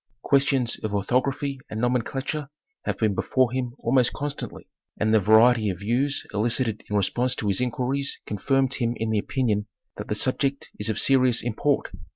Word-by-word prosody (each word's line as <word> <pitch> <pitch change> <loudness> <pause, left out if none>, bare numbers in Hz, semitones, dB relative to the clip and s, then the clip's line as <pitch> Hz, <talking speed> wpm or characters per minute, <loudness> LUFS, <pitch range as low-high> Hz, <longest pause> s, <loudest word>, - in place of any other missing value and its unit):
Questions 135 -3 +2
of 105 -1 -3
orthography 130 +6 0
and 110 - -4
nomenclature 135 +4 -1 0.4
have - - -1
been 110 -3 +1
before 130 +5 +1
him 125 -1 -3
almost 125 0 +2
constantly, 145 0 -5 0.3
and 110 0 +2
the 110 - +6
variety 110 +2 +5
of 90 - -3
views 130 +7 0
elicited 115 +1 0
in 105 - -1
response 120 +5 +1
to 105 - -3
his 100 +3 +1
inquiries 130 +3 -1
confirmed 135 +5 0
him 120 -2 -1
in 110 0 -2
the 110 - +2
opinion 105 -3 -1 0.3
that - - -6
the 105 - -1
subject 135 +4 -1
is 105 +2 -1
of 110 - -1
serious 130 -4 +3
import. 120 +5 0
125 Hz, 170 wpm, -25 LUFS, 110-135 Hz, 0.4 s, the